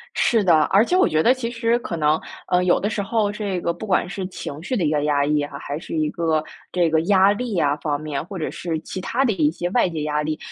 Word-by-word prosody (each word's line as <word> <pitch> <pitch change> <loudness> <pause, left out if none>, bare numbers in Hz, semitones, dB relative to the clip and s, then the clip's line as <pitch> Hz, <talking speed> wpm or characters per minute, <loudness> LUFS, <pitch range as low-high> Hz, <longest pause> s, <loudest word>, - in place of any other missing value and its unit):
是 225 -3 +2
的， 165 -4 +5
而 200 +3 +6
且 355 - 0
我 370 - +5
觉 155 0 +2
得 240 - +5
其 245 -3 -4
实 235 0 +1
可 190 - -5
能， 155 -1 +2 0.3
呃， 180 0 +3
有 180 - +3
的 205 - -1
时 210 - -2
候 205 0 0
这 205 -3 -3
个 170 - 0
不 175 - -8
管 185 -3 +1
是 195 0 -4
情 150 -5 -7
绪 255 +7 -2
的 195 - 0
一 150 - +1
个 150 -1 +1
压 145 -1 +2
抑 150 0 +1
啊， 145 -1 -5
还 145 0 -5
是 165 - -7
一 155 -1 +1
个 160 -2 0 0.3
这 175 -2 +2
个 160 0 +3
压 190 +2 +4
力 230 +2 -3
呀 145 -6 +2
方 145 -1 -2
面， 150 -2 -4
或 190 +2 -7
者 160 - -2
是 165 -2 -3
其 185 - -7
它 245 +7 0
的 250 - +2
一 155 -5 +2
些 175 +2 -3
外 240 -2 +3
界 160 -3 -4
压 150 0 0
力。 155 0 -2
175 Hz, 295 characters per minute, -22 LUFS, 155-205 Hz, 0.3 s, 而